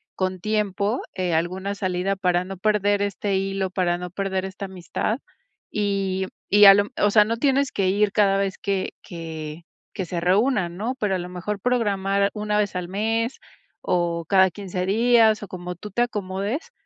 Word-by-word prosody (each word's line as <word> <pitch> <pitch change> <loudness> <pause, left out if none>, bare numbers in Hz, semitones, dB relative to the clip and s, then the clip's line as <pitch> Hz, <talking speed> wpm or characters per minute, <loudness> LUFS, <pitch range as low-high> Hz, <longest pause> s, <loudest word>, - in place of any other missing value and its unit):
con 185 -1 -2
tiempo 210 +2 0
eh, 180 -2 -1
alguna 185 +4 -1
salida 185 0 -1
para 180 -2 +1
no 190 +1 -7
perder 205 0 +2
este 200 0 -1
hilo, 195 0 -1
para 180 -2 0
no 180 0 -5
perder 190 0 -2
esta 195 +1 -6
amistad. 190 +5 -3 0.5
Y 195 -2 -1 0.2
y 205 +1 +7
a 195 - +11
lo 200 +1 +3
o 205 - +3
sea, 210 0 +6
no 230 +2 -1
tienes 275 +1 +2
que 190 -2 +1
ir 205 +1 +2
cada 200 -2 +3
vez 195 -1 -1
que 195 -2 -2
que 160 -1 -7 0.3
que 190 - -3
se 175 0 -3
reúnan, 185 0 +1
¿no? 235 +6 -2
Pero 200 -3 +1
a - - 0
lo 175 0 -6
mejor 185 +3 -4
programar 200 -5 +1
una 210 -1 -1
vez 205 -2 0
al 180 -1 -3
mes 225 +5 -1 0.4
o 170 -2 0
cada 190 0 +5
15 185 -1 -4
días 225 +1 +4
o - - -6
como 180 -1 -6
tú 210 +4 -9
te 240 - 0
acomodes, 205 - -3
195 Hz, 180 wpm, -23 LUFS, 185-210 Hz, 0.5 s, a